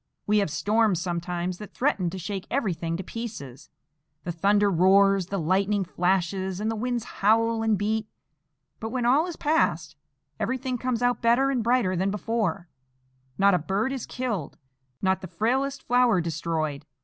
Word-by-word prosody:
We 210 0 +3
have 200 - 0
storms 210 +2 +1
sometimes 175 0 -3
that 210 - -10
threaten 200 -10 +1
to 190 - -6
shake 190 +1 -5
everything 170 - -1
to 190 - -5
pieces,—the 150 - -9
thunder 200 +4 +2
roars, 195 +1 +4
the 195 - -3
lightning 195 +4 +1
flashes, 185 +1 -1
and 215 +2 -1
the - - -3
winds 240 +1 -2
howl 225 +2 +1
and 220 -2 +2
beat; 215 +2 -1 0.7
but, 225 - -4
when 245 0 -2
all 280 +8 +4
is 345 - -5
past, 315 +2 0 0.4
everything 260 -1 -2
comes 250 -1 -1
out 245 0 +1
better 245 +4 +3
and 250 -4 0
brighter 230 -5 +2
than 190 +3 0
before,—not 160 - -2
a 180 - +3
bird 200 - -1
is 265 - -5
killed, 225 - -4 0.5
not 190 0 +2
the 185 - -6
frailest 265 +8 -1
flower 245 -4 +3
destroyed. 160 -3 -3
200 Hz, 155 wpm, -26 LUFS, 175-230 Hz, 0.7 s, roars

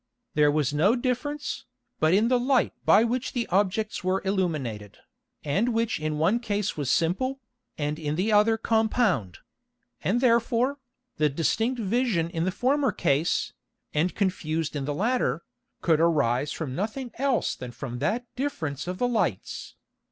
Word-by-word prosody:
There 150 -1 +4
was 145 -2 +1
no 185 +11 +4
difference, 270 +4 -3 0.3
but 155 +1 +3
in 210 +5 +4
the 250 0 +3
Light 255 0 +2
by 215 - +6
which 245 +2 -1
the 240 -2 -1
Objects 205 +3 0
were 185 +1 0
illuminated, 150 - -2 0.5
and 205 +11 0
which 230 -4 0
in 155 0 -2
one 180 +10 +2
Case 210 -4 -2
was 145 -4 -2
simple, 255 - +1 0.4
and 150 +1 -2
in 150 -1 -2
the 190 +6 0
other 215 +2 +4
compound; 220 - +1 0.7
and 195 +10 +2
therefore, 240 +2 +2 0.4
the 150 -1 +3
distinct 220 - 0
Vision 205 -6 0
in 165 0 -1
the 185 - +1
former 265 +7 +1
Case, 145 +4 0 0.4
and 165 +4 +1
confused 165 -6 -1
in 140 -2 -2
the 145 0 -2
latter, 240 - 0 0.4
could 160 -3 +3
arise 145 -4 +2
from 150 -6 -4
nothing 225 - -3
else 270 -3 +1
than 125 - -7
from 120 0 -6
that 215 - 0
difference 170 - -3
of 180 0 -3
the 245 - +1
Lights. 240 -2 -2
190 Hz, 155 wpm, -26 LUFS, 155-235 Hz, 0.7 s, by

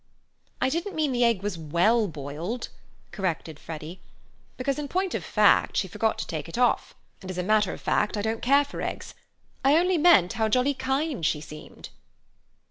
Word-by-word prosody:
"I 260 - +2
didn't 340 +7 -3
mean 305 -3 +1
the 245 -1 +1
egg 230 -5 +2
was 205 -5 -3
well 180 +9 +2
boiled," 160 - -5 0.4
corrected 165 -5 -3
Freddy, 160 +2 -8 0.6
"because 275 +3 -1
in 295 - -4
point 370 +5 -1
of - - -2
fact - - +3
she - - +1
forgot 220 -1 -1
to - - -3
take 160 0 -5
it 165 - -6
off, 245 0 +1 0.3
and 190 - -9
as 185 - -5
a 180 - -1
matter 210 0 +2
of - - -8
fact 210 +1 0
I 205 - -2
don't 220 +1 -2
care 280 +3 +4
for 285 - -7
eggs. - - -5 0.5
I 280 +3 +5
only 360 0 +2
meant 295 - +5
how 220 -1 0
jolly 255 +5 +2
kind 270 - -2
she 155 -1 +1
seemed." 150 0 -11
220 Hz, 190 wpm, -26 LUFS, 175-275 Hz, 0.6 s, I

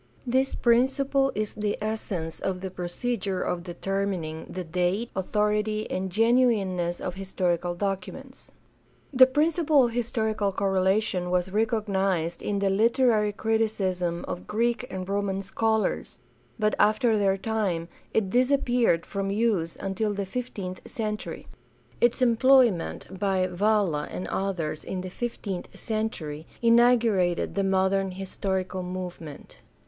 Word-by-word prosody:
This 260 +2 +1
principle 270 +3 +2
is 215 0 -2
the 210 -1 -2
essence 205 -6 -3
of 185 -1 -2
the 190 -1 -5
procedure 190 +2 -2
of 175 - -2
determining 180 -2 -3
the 185 - -5
date, 180 +7 -1
authority, 210 +2 0
and 190 +1 -2
genuineness 210 -6 +2
of 180 - -4
historical 180 -2 -1
documents. 200 +8 -5 0.6
The 255 0 +8
principle 300 0 +3
of 235 - -2
historical 220 -3 -1
correlation 190 -1 +1
was 180 +1 0
recognized 195 -6 0
in 205 - -1
the 200 -1 +1
literary 225 0 +3
criticism 200 -6 -1
of 180 - -5
Greek 235 +3 0
and 185 -1 -5
Roman 195 -1 -1
scholars, 220 +1 -1 0.4
but 215 0 +1
after 220 +2 +4
their 195 -2 +2
time 195 -5 -1 0.2
it 200 -4 0
disappeared 245 -7 +2
from 195 -1 -3
use 200 -6 0
until 205 +2 -1
the 200 0 -2
fifteenth 195 -4 -5
century. 210 -2 -4 0.6
Its 240 +2 +3
employment 235 -7 +3
by 190 -2 +1
Valla 185 -4 +1
and 180 - -5
others 170 -6 -2
in 185 - -4
the 185 0 -7
fifteenth 200 -5 -4
century 165 -9 -3
inaugurated 230 -6 +3
the 200 - 0
modern 190 0 +2
historical 190 0 -3
movement. 180 -4 -7
200 Hz, 125 wpm, -26 LUFS, 185-225 Hz, 0.6 s, The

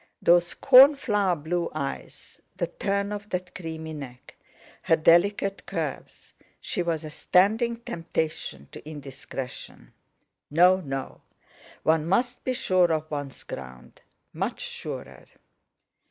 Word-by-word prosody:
Those 175 0 +3
cornflower 255 -8 +6
blue 170 +3 -2
eyes, 140 -3 -6
the 185 -2 -1
turn 200 +3 -2
of 205 0 -6
that 180 0 -4
creamy 160 -2 -6
neck, 130 -4 -10 0.5
her 165 - +3
delicate 195 +5 +3
curves—she - - -5
was 165 -2 -1
a 155 - -7
standing 220 +9 +2
temptation 160 - -4
to 155 - -10
indiscretion! 135 -3 -8 0.6
No! 180 +5 +5
No! 135 -7 -6 0.6
One 160 0 +2
must 245 +7 0
be 255 - -1
sure 185 -7 +2
of 155 0 -2
one's 145 -2 -5
ground—much 65 -1 -8
surer! - - -7
170 Hz, 110 wpm, -26 LUFS, 150-195 Hz, 0.6 s, cornflower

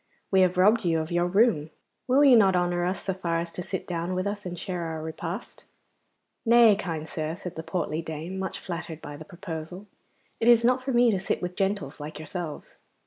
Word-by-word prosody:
'We 190 -1 +5
have 180 0 +3
robbed 210 +5 +5
you 165 -2 +2
of 160 +2 -4
your 175 0 +2
room. 190 -5 +3 0.4
Will 265 +3 +5
you 265 -3 +8
not 195 -4 +5
honour 175 0 +1
us 180 0 -2
so 190 - -1
far 170 -3 -2
as 170 0 -4
to 180 - -5
sit 190 +1 -4
down 175 +1 -3
with 185 +1 -1
us 205 -1 -3
and 175 0 -6
share 180 -2 -4
our 160 -1 -4
repast?' 165 +6 -6 0.8
'Nay, 235 -2 +6
kind 165 -6 -4
sir,' 155 0 -3
said 180 -1 -8
the 160 - -4
portly 165 -2 -2
dame, 160 +4 -6
much 190 - -3
flattered 170 -3 -6
by 145 - -8
the 155 +2 -10
proposal; 175 0 -7 0.5
'it 225 - 0
is 235 -1 +6
not 255 +1 +3
for 270 - -2
me 240 -1 +5
to 195 - 0
sit 190 - -1
with 180 0 -4
gentles 195 -8 -1
like 150 +1 -7
yourselves. 155 0 -6
180 Hz, 215 wpm, -27 LUFS, 165-200 Hz, 0.8 s, you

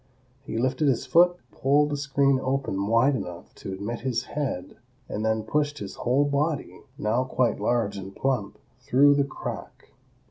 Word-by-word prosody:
He 115 -4 -5
lifted 130 +5 +1
his 130 -1 +1
foot, 175 +6 +5
pulled 145 +2 +2
the - - 0
screen 140 -1 +2
open 130 -8 -1
wide 115 +5 +4
enough 90 -6 -7
to - - -8
admit 100 +5 -4
his 125 -1 -1
head 135 -11 -4 0.3
and 105 - -3
then 110 0 +1
pushed 145 +5 0
his 100 -7 -6
whole 130 +4 +1
body, 145 +1 -1 0.2
now 120 -2 +1
quite 130 -3 0
large 115 -4 0
and 95 0 -8
plump, 130 -7 -1 0.2
through 140 +2 +5
the 140 0 +3
crack. 140 - -7
130 Hz, 165 wpm, -26 LUFS, 110-140 Hz, 0.3 s, foot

